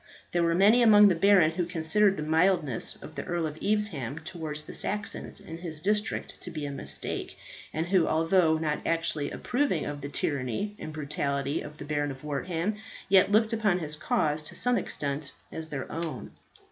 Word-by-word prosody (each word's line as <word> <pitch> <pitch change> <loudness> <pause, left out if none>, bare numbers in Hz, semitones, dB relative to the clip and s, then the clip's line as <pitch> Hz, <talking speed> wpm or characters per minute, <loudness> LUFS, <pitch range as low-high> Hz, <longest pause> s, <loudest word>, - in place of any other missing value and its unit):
There 175 - +1
were 170 0 +2
many 210 +7 +6
among 210 -3 +8
the 180 - +2
barons 180 -2 +5
who 175 0 -1
considered 185 +4 +2
the - - -3
mildness 160 -5 +1
of 155 - -9
the - - -5
Earl 175 -2 -1
of 155 -1 -4
Evesham 190 - -1
towards 160 -3 -5
the - - -9
Saxons 210 0 -3
in 165 -5 -9
his 165 -3 -4
district 210 +5 -1
to - - -6
be 155 -4 -5
a 140 - -4
mistake, 140 - -3 0.3
and 160 +1 -2
who, 180 -1 +3
although 165 0 +3
not 155 -1 -1
actually 165 -3 0
approving 250 - -1
of 145 0 -5
the 140 - -5
tyranny 145 - -2
and 155 - -6
brutality 140 -1 -2
of 150 - -9
the 145 - -8
Baron 145 -1 -1
of 135 0 -8
Wortham, 165 +7 -2 0.3
yet 195 +1 +5
looked 220 +1 +3
upon 215 -5 +2
his 155 -4 -3
cause 150 0 0
to 150 - -7
some 245 0 +2
extent 140 0 -4 0.2
as 160 0 -5
their 135 -3 -4
own. 165 0 -5
165 Hz, 185 wpm, -28 LUFS, 150-195 Hz, 0.3 s, among